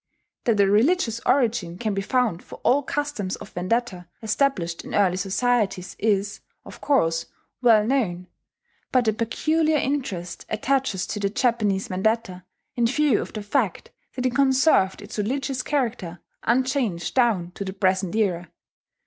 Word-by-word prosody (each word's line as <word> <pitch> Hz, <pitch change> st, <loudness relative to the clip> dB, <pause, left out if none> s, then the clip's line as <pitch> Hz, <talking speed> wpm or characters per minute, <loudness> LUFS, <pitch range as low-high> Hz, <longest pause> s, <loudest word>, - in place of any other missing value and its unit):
That 225 Hz, -4 st, +2 dB
a 200 Hz, -, +6 dB
religious 230 Hz, -, +2 dB
origin 225 Hz, -10 st, +1 dB
can 215 Hz, 0 st, -2 dB
be 195 Hz, -, -1 dB
found 230 Hz, -5 st, 0 dB
for -, -, -11 dB
all 275 Hz, +3 st, +4 dB
customs 285 Hz, -9 st, -3 dB
of -, -, -11 dB
vendetta 185 Hz, -1 st, -2 dB, 0.2 s
established 215 Hz, -7 st, 0 dB
in -, -, -6 dB
early 190 Hz, -3 st, +3 dB
societies 195 Hz, -1 st, 0 dB
is, 200 Hz, -2 st, 0 dB, 0.3 s
of -, -, -12 dB
course, 165 Hz, -, +1 dB, 0.3 s
well 225 Hz, -4 st, +5 dB
known; 210 Hz, -9 st, 0 dB, 0.7 s
but 250 Hz, -3 st, +2 dB
a 220 Hz, -, +3 dB
peculiar 310 Hz, +8 st, +1 dB
interest 255 Hz, -12 st, -3 dB
attaches 250 Hz, -3 st, 0 dB
to 210 Hz, -, -4 dB
the 200 Hz, -1 st, 0 dB
Japanese 210 Hz, -4 st, 0 dB
vendetta 190 Hz, -1 st, -1 dB, 0.3 s
in 235 Hz, -1 st, +2 dB
view 295 Hz, +2 st, +2 dB
of -, -, -8 dB
the 215 Hz, -, -5 dB
fact 210 Hz, -3 st, -1 dB, 0.2 s
that 255 Hz, -1 st, -3 dB
it 255 Hz, -, +1 dB
conserved 265 Hz, -7 st, +3 dB
its -, -, -7 dB
religious 265 Hz, +4 st, -1 dB
character 230 Hz, -, -2 dB, 0.2 s
unchanged 245 Hz, -7 st, 0 dB
down 220 Hz, -9 st, +2 dB
to 200 Hz, -, -6 dB
the 190 Hz, -, -4 dB
present 190 Hz, -1 st, 0 dB
era. 180 Hz, -6 st, 0 dB
220 Hz, 150 wpm, -24 LUFS, 190-255 Hz, 0.7 s, a